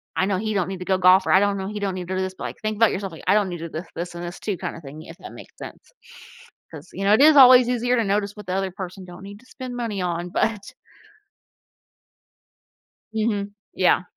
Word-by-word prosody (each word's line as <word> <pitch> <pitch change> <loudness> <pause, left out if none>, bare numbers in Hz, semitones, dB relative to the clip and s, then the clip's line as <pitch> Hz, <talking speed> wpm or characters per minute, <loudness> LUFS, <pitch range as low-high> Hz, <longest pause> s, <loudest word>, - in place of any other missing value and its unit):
I 190 - +1
know 195 -1 0
he 215 +2 -2
don't 190 -3 -1
need 190 -1 -6
to 180 - -7
go 190 0 +1
golf," 185 +1 +5
or, - - +2
I 190 - +7
don't 200 -1 +1
know, 190 0 -4
"He 210 +1 -5
don't 195 -2 -1
need 180 -1 -6
to 185 - -3
do 185 - -1
this." 190 0 -3
But, - - -7
like, - - -6
think 215 -1 -3
about 225 0 +4
yourself, 195 0 -4
like, 160 - -12
"I 185 - +5
don't 205 -3 +2
need 175 -1 -6
to 165 - -5
do 155 - -5
this, 170 - -10
this 175 +1 -5
and 170 - -6
this 175 +1 -7
too," 205 -4 -3
kinda - - -6
thing, 150 +1 -10
if 165 +1 -12
that - - -11
makes - - -13
sense - - -11 0.8
'cause, 160 +1 -11
you 195 - -5
know, 200 - +5
it 220 - +4
is 300 0 +7
always 255 -2 +8
easier 245 0 +1
to 230 - +2
notice 200 0 -1
what 210 - -11
the 180 - -2
other 190 0 -1
person 185 0 -8
don't 180 +1 -12
need 200 +1 -10
to 250 - -22
spend 255 -1 -8
money 225 -5 -3
on, 175 -1 -2
but 210 +2 -2 2.4
Mhm. 210 -2 -1 0.2
Yeah. 185 0 +3
195 Hz, 265 wpm, -23 LUFS, 180-215 Hz, 2.4 s, always